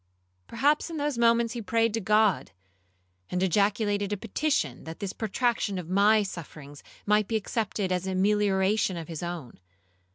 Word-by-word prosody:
Perhaps 295 +4 +1
in 330 - -5
those 290 -4 -2
moments 235 -1 +3
he 240 - -4
prayed 230 +1 +1
to 225 - 0
God, 210 -1 +2 0.8
and 180 +1 -1
ejaculated 205 +2 +1
a 205 - -1
petition, 220 - -1
that 160 0 -8
this 195 -2 -4
protraction 220 -2 -1
of 180 -1 -6
my 210 +2 +4
sufferings 150 -6 -9 0.2
might 210 0 +3
be 225 - -2
accepted 210 -2 -2
as 180 +1 -1
a 190 - -2
melioration 200 -1 +2
of 160 - -8
his 160 -2 -6
own. 170 - -6
205 Hz, 160 wpm, -27 LUFS, 185-225 Hz, 0.8 s, my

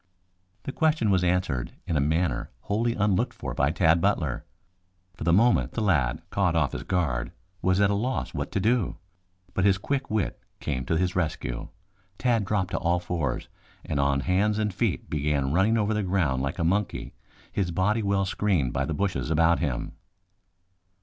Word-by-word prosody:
The - - -4
question 155 -9 +2
was 95 -2 +3
answered 90 -9 0
in 85 - -2
a - - +3
manner 80 -1 0
wholly 115 - 0
unlooked 105 -2 +1
for - - -5
by 70 - +2
Tad 80 +1 +3
Butler. 85 -10 0 0.7
For - - -8
the 85 - +3
moment 115 +7 +3
the 115 - -2
lad, 80 -7 +1
caught 90 -4 +1
off 75 -5 +2
his - - -4
guard, 75 -10 -1 0.3
was 95 +1 +2
at 100 0 +4
a - - +2
loss 125 +6 -2
what - - -3
to - - +1
do. 115 0 +1 0.6
But 95 - 0
his 95 -1 +4
quick 135 +7 -2
wit 105 -4 -1 0.2
came 65 -4 -3
to 80 - +1
his 90 +1 0
rescue. 80 -8 -2 0.5
Tad 115 -5 +1
dropped 95 -2 0
to - - -1
all 85 +1 +1
fours 80 -7 -2 0.4
and 70 - -2
on 70 0 +2
hands 100 +6 +1
and 105 -2 0
feet - - -1
began 70 -2 0
running 100 +6 +3
over 110 0 +1
the 105 - 0
ground 90 -9 +1
like 70 +6 -2
a 85 - -1
monkey, 100 +5 -1 0.4
his 95 -4 -1
body 95 +6 +1
well 100 -1 +1
screened 95 -10 0
by - - 0
the 80 - -2
bushes 95 -3 -1
about 85 +1 +3
him. 70 -7 -2
90 Hz, 185 wpm, -26 LUFS, 80-105 Hz, 0.7 s, at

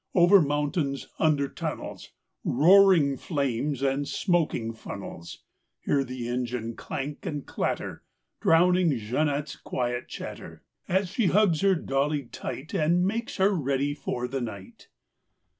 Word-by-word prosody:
Over 180 +2 +7
mountains, 145 -1 -1
under 150 -3 +2
tunnels, - - -6 0.3
Roaring 165 -2 +5
flames 140 -2 -2
and 140 +1 0
smoking 155 - 0
funnels— 85 -6 -9 0.4
Hear 140 -1 +1
the 125 -2 -5
engine 120 -2 -3
clank 145 +2 -5
and 145 -3 -4
clatter! - - -3 0.4
Drowning 175 -3 +4
Jeanette's 140 +6 -1
quiet 120 -1 -3
chatter - - -8 0.2
As 190 +1 +1
she 200 +2 +1
hugs 190 -5 +3
her 195 -1 +4
dolly 145 -1 0
tight 130 +4 -7
And 170 +4 +2
makes 225 +4 -2
her 195 +1 +4
ready 140 -4 0
for 125 -4 -3
the 135 +1 -3
night. 100 -5 -8
145 Hz, 125 wpm, -27 LUFS, 130-175 Hz, 0.4 s, Over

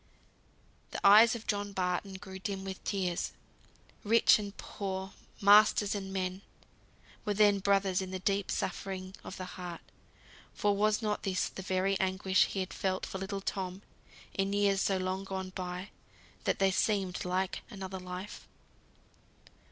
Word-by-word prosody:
The - - -5
eyes 220 +4 +8
of 225 - -7
John 205 -1 -2
Barton 185 +1 -1
grew 190 -1 -8
dim 195 -1 -4
with 190 -1 -6
tears. 185 -4 -1 0.7
Rich 225 +1 +6
and 200 -1 -6
poor, 190 -1 -5 0.3
masters 205 0 +6
and 195 -2 -4
men, 185 0 -2 0.8
were 210 -2 -1
then 205 -1 +5
brothers 195 -1 +2
in 190 - -5
the 185 - -3
deep 195 +1 0
suffering 190 0 -3
of - - -8
the 185 - -5
heart; 180 -2 -7 0.7
for 205 -1 +2
was 215 +2 +2
not 210 -1 0
this 190 -2 0
the - - -8
very 190 +1 0
anguish 190 0 +3
he 195 - -3
had 185 - -5
felt 190 -1 -1
for 190 - -6
little 195 +1 -4
Tom, 190 0 -4 0.5
in 195 0 0
years 200 -1 +3
so 195 - +2
long 185 +1 -2
gone 190 -1 -5
by 180 +1 -5 0.5
that - - +1
they 195 -1 +3
seemed 195 -2 0
like 185 +1 -1
another 190 -3 -6
life! 180 +2 -7
195 Hz, 150 wpm, -31 LUFS, 185-200 Hz, 0.8 s, eyes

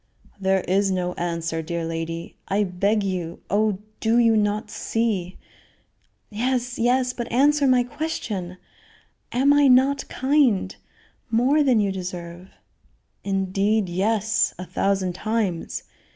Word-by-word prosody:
"There 190 0 +2
is 195 +3 +1
no 180 -1 -1
answer, 165 -2 -3
dear 170 +1 -3
lady 165 0 -5
I 200 +2 +1
beg 200 +3 0
you 180 -4 -4
oh, 210 -1 +2 0.2
do 225 +1 +2
you 230 -2 +4
not 210 0 0
see 205 -6 -2 0.5
" - - -44 0.3
"Yes, 245 +2 -1
yes; 250 +2 +2
but 240 -1 -5
answer 285 +3 +3
my 250 -1 +4
question; 220 - -4 0.7
am 270 +4 +4
I 290 -1 +5
not 270 +2 +3
kind 260 -9 +2 0.5
more 250 +7 +3
than 260 -6 +3
you 200 -2 +1
deserve?" 180 -1 -7 0.7
"Indeed, 195 +1 0
yes; 205 +3 +1
a 180 - -6
thousand 190 -1 0
times. 210 -3 -2
205 Hz, 125 wpm, -23 LUFS, 185-240 Hz, 0.7 s, I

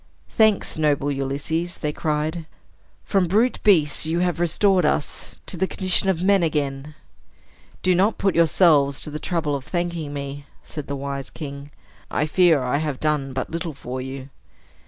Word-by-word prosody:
"Thanks, 220 -7 +2
noble 145 -2 +1
Ulysses!" 145 +5 -2
they 150 -1 -3
cried. 155 +1 -2 0.6
"From 195 -3 +1
brute 220 +8 +2
beasts 160 -8 +4
you 160 +1 -1
have 175 -1 0
restored 180 +2 +2
us 150 0 -1
to - - +3
the 190 +3 +1
condition 190 0 0
of 180 -2 0
men 195 0 +4
again." 150 -2 -2 0.9
"Do 185 - +4
not 195 +5 +2
put 195 -2 +1
yourselves 155 -4 +4
to 150 - -4
the 150 - -5
trouble 155 -3 -1
of 135 - -5
thanking 170 -2 -3
me," 140 0 -6 0.2
said 150 -3 -7
the 140 - -3
wise 140 0 -5
king. 140 -2 -8 0.4
"I 150 - 0
fear 160 -3 +4
I 125 +3 0
have 150 -3 -2
done 150 -3 0
but 130 - -3
little 165 -1 -3
for 130 -1 -6
you." 130 +1 -7
155 Hz, 165 wpm, -23 LUFS, 140-175 Hz, 0.9 s, beasts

